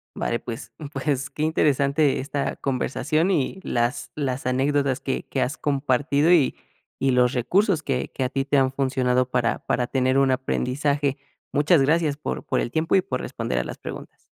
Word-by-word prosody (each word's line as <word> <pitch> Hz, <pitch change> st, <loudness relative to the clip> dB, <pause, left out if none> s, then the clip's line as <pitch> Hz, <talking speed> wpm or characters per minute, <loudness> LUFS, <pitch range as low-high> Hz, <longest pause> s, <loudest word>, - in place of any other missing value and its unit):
Vale, 120 Hz, -, -1 dB
pues, 115 Hz, +2 st, -8 dB, 0.2 s
pues 135 Hz, -1 st, -1 dB
qué 150 Hz, -, -4 dB
interesante 145 Hz, -2 st, +2 dB
esta 140 Hz, +1 st, -3 dB
conversación, 155 Hz, +6 st, 0 dB
y 185 Hz, +3 st, -1 dB
las, 120 Hz, +2 st, -1 dB
las 135 Hz, -3 st, -2 dB
anécdotas 135 Hz, +1 st, +1 dB
que 135 Hz, -1 st, -3 dB
que 135 Hz, -, -3 dB
has 140 Hz, +4 st, -1 dB
compartido, 145 Hz, +2 st, +1 dB
y 160 Hz, -7 st, +4 dB, 0.4 s
y 135 Hz, -, +2 dB
los 125 Hz, -1 st, +4 dB
recursos 175 Hz, -, +2 dB
que 135 Hz, -5 st, -2 dB
que 135 Hz, -, -3 dB
a -, -, -1 dB
ti 135 Hz, +1 st, -1 dB
te 140 Hz, +1 st, +2 dB
han 130 Hz, -1 st, +3 dB
funcionado 130 Hz, -2 st, +1 dB
para 120 Hz, -2 st, 0 dB
para 125 Hz, -1 st, 0 dB
tener 130 Hz, 0 st, +1 dB
un 135 Hz, -1 st, +4 dB
aprendizaje. 135 Hz, +2 st, 0 dB, 0.4 s
Muchas 150 Hz, +2 st, +4 dB
gracias 150 Hz, +1 st, +2 dB
por 150 Hz, -, -4 dB
por -, -, 0 dB
el 120 Hz, -, -2 dB
tiempo 160 Hz, +5 st, +1 dB
y 190 Hz, -, +5 dB
por 195 Hz, -, -3 dB
responder -, -, -3 dB
a -, -, -1 dB
las -, -, -7 dB
preguntas. -, -, -9 dB
135 Hz, 180 wpm, -24 LUFS, 130-150 Hz, 0.4 s, y